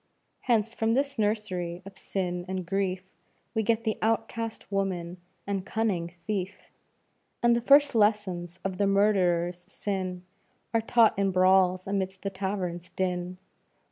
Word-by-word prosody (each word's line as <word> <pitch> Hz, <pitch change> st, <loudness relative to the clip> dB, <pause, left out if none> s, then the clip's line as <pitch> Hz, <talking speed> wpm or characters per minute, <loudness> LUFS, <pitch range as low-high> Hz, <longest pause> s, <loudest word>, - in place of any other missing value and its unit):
Hence, 225 Hz, -2 st, +1 dB
from 225 Hz, 0 st, +1 dB
this 275 Hz, -2 st, -1 dB
nursery 185 Hz, -5 st, -1 dB
of 195 Hz, -1 st, -11 dB
sin 180 Hz, -2 st, -3 dB
and 185 Hz, -1 st, -3 dB
grief, 185 Hz, 0 st, -1 dB, 0.5 s
We 220 Hz, -, +1 dB
get 225 Hz, +1 st, +1 dB
the 220 Hz, -2 st, -1 dB
outcast 225 Hz, 0 st, -2 dB
woman 185 Hz, -3 st, -2 dB, 0.3 s
and 195 Hz, -2 st, -2 dB
cunning 190 Hz, -6 st, -1 dB
thief; 200 Hz, -2 st, -4 dB, 0.7 s
And 235 Hz, 0 st, +5 dB
the 235 Hz, -, 0 dB
first 285 Hz, +3 st, +6 dB
lessons 205 Hz, -6 st, +1 dB
of 190 Hz, 0 st, -3 dB
the 200 Hz, -, +3 dB
murderer's 180 Hz, -3 st, +2 dB
sin 185 Hz, -3 st, -3 dB, 0.5 s
Are 230 Hz, -, +3 dB
taught 225 Hz, -2 st, +4 dB
in 200 Hz, 0 st, +2 dB
brawls 185 Hz, 0 st, +4 dB
amidst 190 Hz, -1 st, -2 dB
the 200 Hz, -, -2 dB
tavern's 185 Hz, -2 st, -3 dB
din. 180 Hz, -1 st, -2 dB
195 Hz, 140 wpm, -28 LUFS, 180-220 Hz, 0.7 s, first